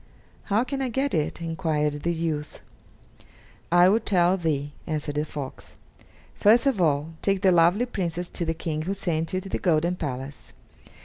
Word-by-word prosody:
"How 215 +3 +2
can 270 +2 -4
I 260 - -1
get 270 +4 -1
it?" 160 +1 -1
enquired 150 -3 -1
the 170 - 0
youth. 160 -3 -3 1.1
"I 175 +1 +6
will 210 +4 +4
tell 185 -4 +3
thee," 145 -5 -2
answered 150 -2 -2
the 150 +1 -1
fox; 145 -3 -8 0.6
"first 230 +5 +4
of 260 -9 +2
all, 155 0 +1
take 195 0 0
the 190 - +6
lovely 175 +7 +4
Princess 175 -7 -3
to 175 - -2
the 165 -1 -1
King 160 -2 -3
who 190 +5 -2
sent 165 -4 -2
you 185 - 0
to 195 - -9
the - - -2
golden 170 0 +2
palace. 135 -2 -6
170 Hz, 175 wpm, -25 LUFS, 155-195 Hz, 1.1 s, I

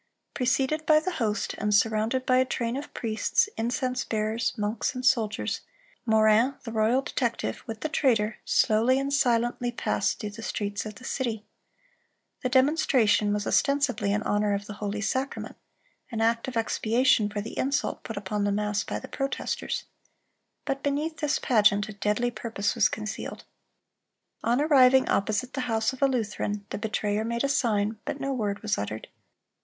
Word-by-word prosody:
Preceded 270 +4 +1
by 310 -1 +6
the 370 +4 -3
host, 215 -1 0
and 210 -1 +1
surrounded 220 +4 +1
by 255 - +4
a 255 - +5
train 235 -1 -2
of 280 +2 -6
priests, 230 - 0
incense 250 +2 -1
bearers, 220 +1 -1
monks, 210 +4 -1
and 255 0 -4
soldiers, 225 -5 +1 0.5
Morin, 220 +4 +4
the 230 - -6
royal 225 +4 +2
detective, 235 - -2
with 225 -2 -6
the - - 0
traitor, 225 -8 +1
slowly 230 +4 +3
and 275 +1 -1
silently 240 -2 +1
passed 240 - -1
through 210 -2 -4
the 215 +2 -9
streets 205 -1 -3
of 210 - -8
the 255 - -14
city. 230 -5 -3 1.0
The 255 - -1
demonstration 260 -6 +3
was 205 0 -1
ostensibly 280 -7 +1
in 210 +1 0
honor 205 -1 +1
of 200 0 -4
the 210 - -7
"holy 205 0 -2
sacrament," 260 +6 -2 0.5
an 230 -4 -4
act 230 +2 +1
of 250 -2 -3
expiation 225 0 +2
for 205 0 -4
the 220 - -7
insult 275 +2 -1
put 225 - -6
upon 205 +1 -2
the 205 - +1
mass 210 0 0
by - - -4
the - - -8
protesters. 275 0 -3 0.8
But 275 0 -2
beneath 295 +3 -1
this 300 -1 0
pageant 210 -3 +3
a - - -6
deadly 210 +4 0
purpose 220 -4 -2
was 230 -4 +3
concealed. 215 0 -5 1.0
On 240 +3 +2
arriving 265 -3 +5
opposite 215 +5 0
the 265 - -2
house 225 +2 +1
of 260 - -11
a 275 - +6
Lutheran, 210 -4 -2
the - - -3
betrayer 210 -1 -1
made 235 +2 -2
a - - +2
sign, 220 -5 +1
but 280 - -4
no 275 0 -2
word 205 -5 -2
was 210 -3 0
uttered. 105 +2 -5
230 Hz, 170 wpm, -27 LUFS, 210-260 Hz, 1.0 s, by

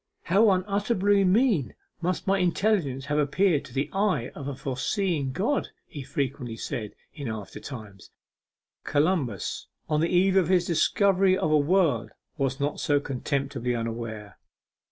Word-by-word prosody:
'How 205 +5 +4
unutterably 200 +1 +2
mean 195 - +2 0.3
must 180 -1 -1
my 195 0 +2
intelligence 175 -7 +1
have 150 +1 0
appeared 150 +2 +2
to - - -13
the 140 +1 0
eye 195 - +1
of 140 - -7
a 140 - -4
foreseeing 140 +3 -1
God,' 225 - 0 0.2
he 145 - -8
frequently 130 -3 -3
said 115 -5 -5 0.2
in 140 -5 -6
after 110 -3 -6
time. 110 -7 -9 0.8
'Columbus 145 - 0 0.2
on 150 -1 +1
the 165 - +1
eve 190 +2 +3
of 185 -4 +4
his 180 -1 +3
discovery 190 +2 +3
of 155 - 0
a 155 - +5
world 155 - +2 0.3
was 135 -2 -1
not 145 +1 -1
so 145 -1 +2
contemptibly 135 -2 -2
unaware. 115 -3 -5
150 Hz, 145 wpm, -26 LUFS, 130-190 Hz, 0.8 s, a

